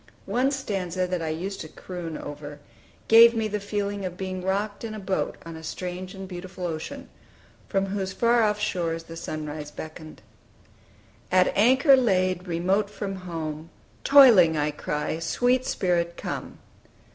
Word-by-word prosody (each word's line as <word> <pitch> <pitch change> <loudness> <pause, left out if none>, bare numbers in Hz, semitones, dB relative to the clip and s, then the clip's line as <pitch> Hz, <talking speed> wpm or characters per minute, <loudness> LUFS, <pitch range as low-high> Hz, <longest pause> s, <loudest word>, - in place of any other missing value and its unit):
One 255 +2 +1
stanza 190 -9 -2
that 180 -1 -2
I 160 - -2
used 180 +5 -4
to - - -6
croon 170 -1 -7
over, 145 0 -8 0.5
gave 230 +1 +8
me 220 -1 0
the 210 0 -2
feeling 205 0 -3
of 180 -1 -5
being 185 -1 -4
rocked 200 +3 -2
in 220 -1 -5
a - - -6
boat 190 -1 -2
on 165 -1 -7
a 160 - -9
strange 180 +3 -6
and 190 0 -7
beautiful 185 0 -7
ocean, 160 -2 -5 0.6
from 195 0 +1
whose 195 -1 -3
far 235 +4 +3
off 210 -1 +2
shores 170 -5 -1
the 165 0 -10
sunrise 155 -2 -5
beckoned: 155 +1 -10 1.1
"At 185 0 +3
anchor 260 +6 +6
laid, 185 -7 +1
remote 185 +4 +1
from 200 -1 -5
home, 160 -1 -5 0.3
Toiling 220 - +7
I 150 0 +1
cry, 150 +2 -3
Sweet 245 +10 +1
Spirit, 170 -2 0
come! - - -5
185 Hz, 155 wpm, -26 LUFS, 165-205 Hz, 1.1 s, gave